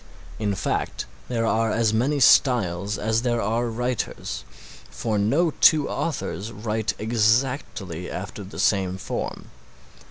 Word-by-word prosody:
In 105 -2 0
fact - - -2 0.2
there 115 -2 -1
are 110 0 +1
as 110 -1 +2
many 135 +6 +1
styles 105 -8 +4
as 110 +1 0
there 120 -1 0
are 115 +3 0
writers, 120 0 -3 0.5
for 110 -2 -2
no 145 +12 +2
two 155 -3 +6
authors 115 -8 -3
write 110 +1 -2
exactly 110 - 0
after 100 +2 -6
the 95 - -10
same 95 -2 +1
form. - - -5
110 Hz, 125 wpm, -24 LUFS, 100-120 Hz, 0.5 s, two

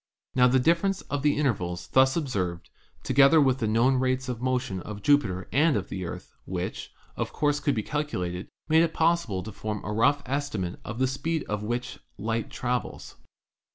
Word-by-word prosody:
Now 125 -1 +5
the 130 +1 +4
difference 170 +8 +2
of 145 -1 -3
the 145 0 +2
intervals 90 - -1
thus 130 0 +4
observed, 95 - -2 0.3
together 140 +4 +5
with 135 -3 +3
the 110 - 0
known 120 +5 +3
rates 130 0 0
of 125 -2 -4
motion 130 -6 -1
of 105 +2 -8
Jupiter 100 -11 +2
and 150 -1 +4
of 95 - -4
the 95 -1 -4
Earth, 85 - -8
which, 90 0 -4 0.2
of - - -3
course, 145 -1 +1
could 145 -3 0
be 110 - -1
calculated, 95 -13 -3 0.2
made 160 +1 +5
it 165 -1 0
possible 160 - +1
to 110 - -7
form 105 +1 -4
a 105 - -3
rough 140 +6 +3
estimate 130 -11 -3
of 105 - -6
the 130 - +2
speed 155 +4 -2
at 105 0 -2
which 120 +3 -3 0.2
light 115 +1 -2
travels. 125 0 -4
125 Hz, 185 wpm, -27 LUFS, 105-145 Hz, 0.3 s, Now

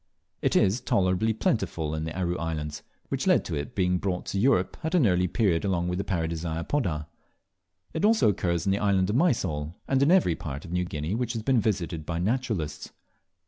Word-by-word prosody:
It - - +1
is 100 +7 +3
tolerably 95 +3 +2
plentiful 80 -7 -1
in 80 0 -2
the 80 +3 -5
Aru 90 -1 0
Islands, 75 -3 -3 0.3
which - - -2
led - - +4
to - - -3
it, 70 0 -5
being 90 -2 +1
brought 90 -2 -2
to 100 - -2
Europe 115 -5 +2
at 160 +3 0
an 160 -8 +4
early 90 -2 +3
period 90 -4 +1
along 90 -3 0
with 90 +2 -1
Paradisea 85 -2 -2
apoda. 85 - -1 0.9
It 160 - -2
also 220 - +5
occurs 85 -4 0
in 95 - +2
the 100 - +1
island 100 -1 +2
of - - -1
Mysol 90 - +1
and 135 0 +2
in 140 - +4
every 180 - +4
part 70 -3 -6
of - - -9
New 90 0 0
Guinea 80 +1 -3
which 120 +1 -1
has 115 -2 -4
been 130 -1 +3
visited 90 -6 -1
by 85 +2 -3
naturalists. 95 - -2
90 Hz, 200 wpm, -27 LUFS, 80-110 Hz, 0.9 s, also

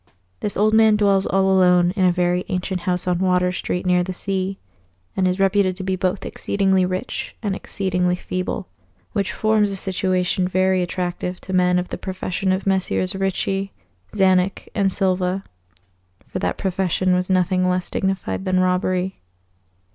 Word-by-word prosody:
This 205 - -3
old 215 +2 +3
man 220 -1 +6
dwells 200 -2 +2
all 195 0 +2
alone 180 -1 +4
in 190 -1 +1
a 180 - +5
very 180 0 +1
ancient 185 -1 -2
house 180 0 -1
on 180 -1 +1
Water 180 -1 +2
Street 180 0 -3
near 180 0 +3
the 185 +1 -3
sea, 195 0 -2 0.6
and 185 -1 +2
is 185 +1 -1
reputed 195 -1 +2
to 190 - -6
be 190 0 0
both 185 +1 -1
exceedingly 190 -2 +1
rich 185 +7 -4
and 200 -3 -1
exceedingly 180 -3 -1
feeble; 185 +1 -4 0.5
which 200 -2 0
forms 215 -1 +2
a 195 - -3
situation 185 -1 0
very 185 0 +2
attractive 180 0 -3
to 190 - -6
men 180 -1 +3
of 180 0 -2
the - - -5
profession 190 0 -2
of 190 +1 -1
Messrs. 190 0 0
Ricci, 195 0 -1 0.4
Czanek, 190 -1 +2
and 195 -2 +1
Silva, 185 0 0 0.8
for - - -5
that - - -1
profession 185 -1 0
was 180 +1 0
nothing 185 0 +2
less 180 0 -1
dignified 190 0 -2
than 185 -1 +2
robbery. 185 0 0
185 Hz, 160 wpm, -21 LUFS, 180-195 Hz, 0.8 s, man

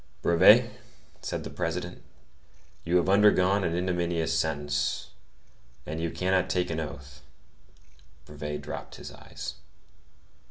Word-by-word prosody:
"Brevet," 85 -1 +6 0.5
said - - -4
the - - -7
President, - - -3 0.8
"you 85 +1 +2
have 85 - +1
undergone 100 -1 +4
an 85 -2 0
ignominious 85 -2 0
sentence, 75 -3 -1 0.7
and 80 +1 -4
you 85 - -1
cannot 95 +2 0
take 90 -1 0
an 80 - -2
oath." 70 -3 -7 1.0
Brevet 75 0 -5
dropped - - -7
his - - -9
eyes. 70 0 -8
80 Hz, 115 wpm, -28 LUFS, 75-90 Hz, 1.0 s, Brevet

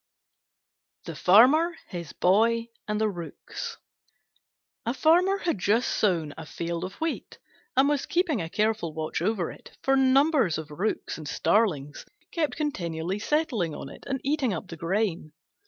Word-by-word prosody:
THE - - -6
FARMER, 275 - +5
HIS 170 -4 -6
BOY, 230 +5 +3 0.2
AND 210 0 -1
THE 220 - +2
ROOKS 205 - -6 1.1
A 235 +3 -2
Farmer 355 +7 +4
had 335 - -1
just 220 +6 +2
sown 165 -8 +1
a 160 - -7
field 170 0 -4
of 185 - -5
wheat, 325 0 -4 0.4
and 270 +1 +6
was 290 -1 0
keeping 345 - +1
a 165 - -4
careful 210 -6 0
watch 155 0 -3
over 190 -2 0
it, - - -15
for 270 - +3
numbers 270 - +4
of 155 -1 -7
Rooks 180 +2 -2
and 155 - -7
starlings 150 -8 +1 0.3
kept 315 -3 -1
continually 180 - -2
settling 235 - 0
on 135 - -7
it - - -12
and 270 -1 -1
eating 275 -7 +1
up 175 +2 -7
the 165 - -6
grain. 170 -2 -1
215 Hz, 155 wpm, -27 LUFS, 170-275 Hz, 1.1 s, and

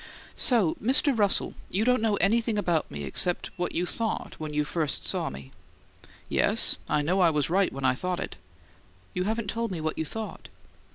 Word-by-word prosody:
"So, 220 -11 +3
Mr. 265 +4 +3
Russell, 205 -3 +1 0.2
you 205 +4 +1
don't 250 -2 +3
know 220 -2 +2
anything 220 +3 +2
about 175 -6 0
me 70 0 -6
except 175 - +1
what 180 -1 -2
you 175 - +1
thought 225 +4 -3
when 155 -1 -5
you 150 0 +1
first 150 0 -2
saw - - -1
me?" 65 0 -10 0.8
"Yes, - - +3
I 150 - +2
know 180 +6 +1
I 175 - +6
was 150 0 0
right 195 +1 +3
when 135 -1 -4
I 130 - +4
thought 180 +6 -3
it." - - -5 0.8
"You 180 - -1
haven't 220 -1 -1
told 230 0 -2
me 180 - -4
what 155 0 -3
you - - +1
thought." 220 +7 -7
180 Hz, 190 wpm, -27 LUFS, 155-220 Hz, 0.8 s, I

